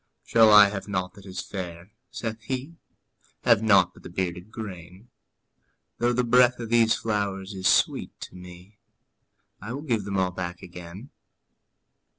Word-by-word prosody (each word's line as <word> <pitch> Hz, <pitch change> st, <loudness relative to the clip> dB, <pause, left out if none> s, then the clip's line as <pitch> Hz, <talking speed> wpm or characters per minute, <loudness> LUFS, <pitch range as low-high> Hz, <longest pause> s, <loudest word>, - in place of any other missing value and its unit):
``Shall 110 Hz, -2 st, +5 dB
I 105 Hz, -1 st, +9 dB
have 100 Hz, 0 st, -6 dB
nought 90 Hz, -2 st, -3 dB
that 100 Hz, -2 st, -15 dB
is 95 Hz, -, -5 dB
fair?'' 90 Hz, 0 st, -7 dB, 0.2 s
saith 110 Hz, -1 st, -5 dB
he; 130 Hz, +8 st, -5 dB, 0.7 s
``Have 115 Hz, -4 st, +5 dB
nought 95 Hz, -5 st, +4 dB
but -, -, -17 dB
the -, -, -10 dB
bearded 90 Hz, +1 st, -4 dB
grain? 95 Hz, 0 st, -9 dB, 0.9 s
Though 120 Hz, 0 st, +2 dB
the 125 Hz, +1 st, +1 dB
breath 125 Hz, +1 st, +4 dB
of 115 Hz, -2 st, -6 dB
these 115 Hz, -1 st, +4 dB
flowers 100 Hz, -2 st, -3 dB
is 95 Hz, -1 st, -1 dB
sweet -, -, +1 dB
to -, -, -9 dB
me, 90 Hz, +3 st, -13 dB, 0.8 s
I 110 Hz, +5 st, -6 dB
will 140 Hz, +3 st, -6 dB
give 115 Hz, -9 st, -1 dB
them 100 Hz, -1 st, -3 dB
all 95 Hz, -1 st, +1 dB
back 90 Hz, -1 st, -6 dB
again.'' 90 Hz, +7 st, -10 dB
100 Hz, 160 wpm, -25 LUFS, 90-115 Hz, 0.9 s, I